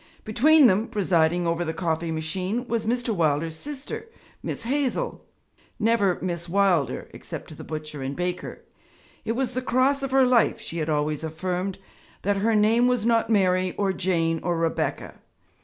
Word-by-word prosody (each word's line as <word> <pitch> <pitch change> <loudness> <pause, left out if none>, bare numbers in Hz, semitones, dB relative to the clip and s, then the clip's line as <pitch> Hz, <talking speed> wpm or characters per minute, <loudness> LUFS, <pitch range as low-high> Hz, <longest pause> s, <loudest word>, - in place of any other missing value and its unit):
Between 285 +8 +5
them, 210 +1 +4
presiding 175 -5 +1
over 170 +1 0
the 160 -1 -3
coffee 165 -2 -1
machine, 185 +9 -2
was 230 -2 -1
Mr. 245 +1 0
Wilder's 160 -2 0
sister, 290 - -6 0.3
'Miss - - -5
Hazel' 280 - -1 0.5
never 210 -5 +2
'Miss 170 -1 -3
Wilder' 185 -6 +1
except - - -8
to - - -9
the - - -9
butcher 155 -2 -6
and 135 +1 -3
baker. 180 0 -4 0.6
It 225 - 0
was 255 0 -1
the 255 - -1
cross 260 +2 +2
of 275 - -2
her 265 0 +4
life, 245 -2 +3
she 170 -6 -5
had 155 0 -2
always 150 0 0
affirmed, 180 +4 -3 0.5
that 200 +1 +1
her 220 +3 +2
name 225 +3 +4
was 250 -3 +1
not 230 -1 +2
Mary 185 -3 +2
or 195 -2 +1
Jane 165 -3 0
or 175 -1 -1
Rebecca. 165 0 -2
190 Hz, 165 wpm, -25 LUFS, 165-235 Hz, 0.6 s, Between